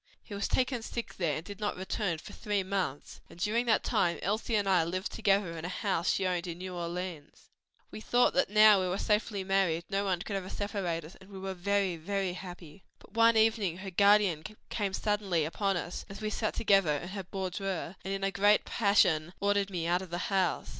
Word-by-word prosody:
He 210 - -10
was 200 0 -1
taken 255 -2 0
sick 235 +1 -6
there 165 -6 0
and 160 - -7
did 205 +1 -9
not 205 -3 -2
return 190 -1 -2
for - - -11
three 205 -3 -1
months, 185 -7 -3
and - - -14
during 225 +6 0
that 220 - +3
time 170 -1 +1
Elsie 215 +3 0
and 205 -2 +1
I 185 -3 +4
lived 185 +4 -3
together 195 -5 +1
in 160 - -7
a 175 - -3
house 185 -3 -1
she 195 - +1
owned 180 -1 -1
in 170 -1 -5
New 185 0 -6
Orleans. 175 -3 -6 0.4
"We - - -8
thought 245 +2 +3
that 275 - +2
now 215 -1 +7
that 185 - 0
we - - -1
were 185 - -1
safely 210 -1 0
married, 190 -4 +1
no 195 +1 +1
one 185 -2 -1
could 205 - -4
ever 190 -1 -4
separate 190 -6 -3
us, 165 - -12
and 190 - -15
we 195 - -9
were 190 0 -4
very, 190 -1 0
very 190 +2 -2
happy. 180 -2 -10
"But - - -20
one 230 0 +5
evening 220 -6 +2
her 190 0 -7
guardian 200 -4 +4 0.3
came 200 -3 -1
suddenly 200 -6 0
upon 195 +4 0
us, 175 0 -5
as 195 0 -8
we 215 0 -3
sat 215 0 -2
together 195 -8 +3
in 175 +5 -7
her 195 0 -5
boudoir, 190 -1 -4
and 190 - -4
in 195 0 -3
a 195 - +1
great 205 +2 +3
passion 180 -6 +2
ordered 200 0 +1
me 175 -4 -3
out 175 +2 +1
of 190 - -8
the 175 +4 -3
house. 190 -2 +1
195 Hz, 220 wpm, -30 LUFS, 175-205 Hz, 0.4 s, now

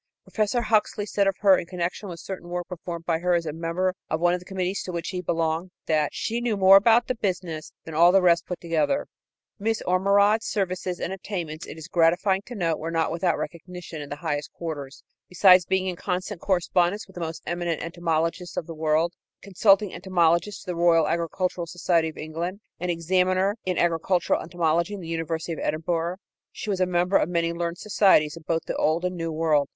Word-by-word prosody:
Professor 220 +2 0
Huxley 215 -1 +1
said 200 -1 +1
of 195 - +1
her 195 -2 +7
in 170 - -7
connection 180 +3 -3
with 170 -1 -7
certain 175 0 -7
work 175 0 -3
performed 170 -2 -6
by 165 -2 +1
her 180 +1 +2
as 170 -1 0
a 155 - -3
member 170 +3 -1 0.2
of 160 - -1
one 175 +1 +3
of 180 - -1
the 180 - -15
committees 190 0 -2
to 185 - -5
which 170 -1 -4
he 180 -1 -3
belonged 165 +1 -1 0.2
that 155 -2 +1
"she 235 +2 -2
knew 235 -3 0
more 190 0 +7
about 230 +4 +6
the - - -1
business" 180 -8 -3
than 160 - -8
all 170 +3 +6
the 195 - +5
rest 170 -1 +3
put 180 - -4
together. 170 - 0 0.5
Miss 220 +2 0
Ormerod's 200 +4 +3
services 185 -2 -2
and 185 - -3
attainments, 175 -5 -5
it - - -9
is 160 0 -9
gratifying 175 +3 +2
to 245 - -7
note, 165 -6 0
were 165 - -4
not 165 -1 0
without 170 +1 0
recognition 175 -2 -7
in 145 - -8
high 145 0 -2
quarters. 145 -5 -6 0.3
Besides 180 -1 +6
being 190 0 +1
in 185 -1 -2
constant 185 +1 -4
correspondence 180 +1 +1
with 190 - -18
the 175 - -7
most 160 0 -5
eminent 175 -1 -2
entomologists 170 +1 -2
of - - -2
the 165 - -7
world, 160 +2 +1 0.3
consulting 200 0 +3
entomologist 175 +1 +1
to - - -14
the - - -4
Royal 165 -2 +4
Agricultural 170 +1 -1
Society 170 -1 +1
of 155 - -12
England 170 +5 -4 0.2
and 180 +1 -3
examiner 185 +3 +1
in 185 -1 -1
agricultural 175 +1 +1
entomology 170 +2 0
in - - -7
the 170 - -8
University 165 0 -3
of - - -6
Edinburgh, 165 +2 -1 0.4
she 210 - -5
was 190 -2 -1
a 185 - +3
member 180 +2 +2
of - - 0
many 170 -1 0
learned 170 0 -3
societies 185 -7 +3
in 165 - -10
both 165 -1 0
the - - -3
Old 160 +3 +1
and 180 - -1
the - - -8
New 165 -1 -3
World. 155 -3 +1
175 Hz, 210 wpm, -25 LUFS, 165-190 Hz, 0.5 s, her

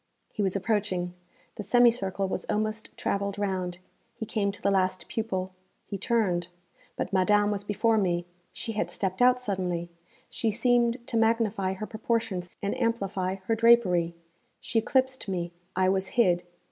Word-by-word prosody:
He - - -2
was 195 -1 +1
approaching; 195 -3 -1 0.4
the - - -3
semicircle 210 -3 +3
was - - -3
almost 215 +1 -1
travelled 200 0 -1
round; 185 -3 -2 0.4
he 220 - -5
came 205 -2 0
to 200 - -9
the 200 - +1
last 185 -1 +1
pupil; 190 -5 -2 0.3
he - - -5
turned. 190 -6 +1 0.5
But - - -3
Madame 205 +2 +4
was 205 -1 -2
before 215 +2 +2
me; 175 -3 0 0.3
she 225 - -5
had 215 - -1
stepped 190 +2 -2
out 250 0 +6
suddenly; 180 -6 -2 0.4
she 225 - -1
seemed 240 +1 +2
to 230 - -1
magnify 225 -4 +2
her 190 +3 -5
proportions 220 -5 -2
and 200 - 0
amplify 195 -5 0
her 225 - +1
drapery; 210 -7 +4 0.4
she 225 - 0
eclipsed 260 +2 +1
me; 175 -2 -2 0.2
I 185 0 +3
was 190 0 +1
hid. 185 -5 +3
200 Hz, 155 wpm, -28 LUFS, 185-225 Hz, 0.5 s, out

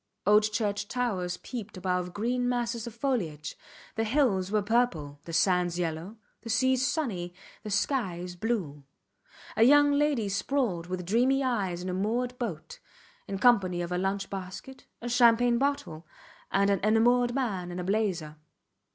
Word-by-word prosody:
Old 210 +1 +4
church 205 -1 -1
towers 195 -8 -2
peeped 225 -3 -7
above 180 -1 -1
green 245 +5 -1
masses 235 -2 -2
of 230 - -8
foliage; 180 - -2 0.4
the 225 - -1
hills 215 -6 +1
were 210 -1 +1
purple, 195 -11 0
the 170 - -7
sands 180 0 +2
yellow, 170 +5 -3 0.2
the 230 - -9
seas 260 +3 +2
sunny, 185 - -2 0.3
the 215 - -7
skies 190 -5 -1
blue. 175 -9 -3 0.7
A - - 0
young 290 +4 +6
lady 285 -6 +1
sprawled 200 -3 -1
with 180 -1 -4
dreamy 255 +8 +2
eyes 195 -9 -1
in 185 - -4
a - - -2
moored 235 +6 -1
boat, 185 -11 -5 0.5
in 195 - -3
company 195 -6 +3
of 170 - -6
a 180 - 0
lunch 195 +1 -1
basket, 195 +7 -8 0.2
a - - -3
champagne 240 0 +4
bottle, 260 - -2 0.4
and 200 +1 +3
an 200 - +2
enamoured 240 +3 +3
man 195 -10 -2
in 175 - -6
a 180 - -3
blazer. 180 -6 -1
210 Hz, 155 wpm, -28 LUFS, 180-245 Hz, 0.7 s, young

